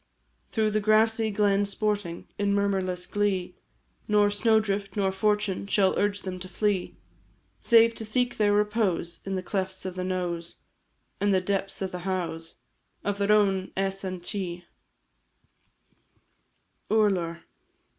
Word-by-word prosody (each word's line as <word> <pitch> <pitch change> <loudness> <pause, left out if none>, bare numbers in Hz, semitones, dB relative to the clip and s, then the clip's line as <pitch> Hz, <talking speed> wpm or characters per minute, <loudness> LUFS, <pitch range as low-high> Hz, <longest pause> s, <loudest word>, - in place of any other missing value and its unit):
Through 215 -1 +1
the 215 - +1
grassy 220 +1 +3
glen 205 -1 +2
sporting 200 -3 -2
In 200 0 +2
murmurless 190 -3 0
glee, 190 -3 -1 0.5
Nor 210 -1 +4
snow 220 +2 +3
drift 200 -1 -2
nor 195 -2 +1
fortune 205 0 0
Shall 195 -2 +3
urge 205 0 0
them 185 -1 -5
to 185 0 -8
flee, 195 0 -1 0.6
Save 230 -1 +5
to 225 - -5
seek 245 +3 0
their 210 -1 +3
repose 205 -5 0
In 195 0 -2
the 185 - -3
clefts 190 0 -3
of 185 - -3
the 185 0 -4
knowes, 175 -2 -3 0.6
And 205 0 +2
the 190 - +4
depths 195 +1 -2
of 190 - -3
the 180 - -5
howes 175 -3 -4 0.5
Of 205 0 -2
their 200 +1 +2
own 195 -3 +2
Eas 195 0 -1
an 185 -2 -4
ti. 175 -1 -4 2.2
URLAR. 185 -6 +1
200 Hz, 140 wpm, -27 LUFS, 185-210 Hz, 2.2 s, Save